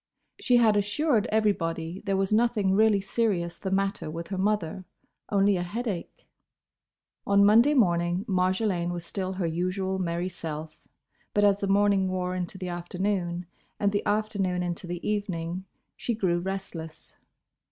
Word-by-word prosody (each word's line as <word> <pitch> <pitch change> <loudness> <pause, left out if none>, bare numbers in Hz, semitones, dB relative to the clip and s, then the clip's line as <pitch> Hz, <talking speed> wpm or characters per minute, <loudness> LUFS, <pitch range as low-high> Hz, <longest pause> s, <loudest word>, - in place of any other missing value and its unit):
She 250 -11 +4
had 225 -3 +5
assured 220 +3 +1
everybody 175 -5 0
there 195 -1 +2
was 195 +1 0
nothing 215 -4 +2
really 210 0 +4
serious 195 -5 -1
the 190 - -3
matter 195 -4 -1
with 165 +2 -6
her 195 - -3
mother: 195 -2 0 0.5
only 200 -1 +3
a - - -1
headache. 215 - -4 1.0
On 200 0 +5
Monday 230 +8 +6
morning 175 -4 +2
Marjolaine 185 -1 +1
was 175 -1 -5
still 190 +1 -3
her 185 -2 -2
usual 185 +3 -1
merry 170 0 -1
self, 155 -3 -7 0.5
but 205 - +3
as 200 -1 +4
the 200 - -1
morning 200 -1 +3
wore 180 -1 -2
into 180 +1 -4
the 185 -1 -5
afternoon 175 0 -2 0.3
and 200 -1 +2
the 205 - 0
afternoon 205 -4 0
into 175 0 -4
the 175 0 -5
evening 185 -3 -2 0.3
she 235 - -2
grew 180 -5 +1
restless. 175 -4 -6
190 Hz, 150 wpm, -27 LUFS, 175-205 Hz, 1.0 s, Monday